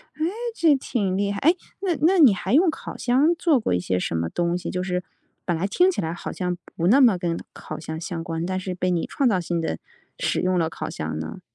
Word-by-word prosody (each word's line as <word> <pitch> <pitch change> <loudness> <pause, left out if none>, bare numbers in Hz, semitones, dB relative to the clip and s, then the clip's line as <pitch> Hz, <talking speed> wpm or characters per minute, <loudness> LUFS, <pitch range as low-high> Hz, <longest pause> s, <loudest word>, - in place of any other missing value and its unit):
哎， 310 - -1 0.3
这 320 -3 +4
挺 205 -8 -1
厉 200 0 0
害。 200 - -3
哎， 330 +6 +4 0.2
那 370 -4 0
那 365 +5 +4
你 270 -10 +8
还 190 - -3
用 335 +6 +5
烤 315 - -6
箱 270 +7 +3
做 325 -5 +3
过 215 - -1
一 90 - +2
些 90 +1 -1
什 85 - -2
么 80 0 0
东 175 - 0
西， 180 - -5
就 180 0 -2
是 180 -1 -2 0.4
本 175 - 0
来 170 - -1
听 360 - +3
起 375 - -1
来 160 0 -2
好 175 - -6
像 180 -1 -2 0.2
不 170 +1 0
那 260 +8 +6
么 230 -8 +6
跟 170 -1 -2 0.2
烤 - - -8
箱 160 0 -6
相 165 -1 -5
关， 165 -1 -3
但 185 +1 -2
是 185 0 -4
被 180 0 0
你 170 -2 0
创 270 -4 +1
造 190 - +2
性 170 -1 -2
地 160 - -2 0.4
使 - - 0
用 185 0 +1
了 160 -1 +1
烤 - - -5
箱 75 - -4
呢？ 80 +1 -6
185 Hz, 270 characters per minute, -24 LUFS, 170-265 Hz, 0.4 s, 你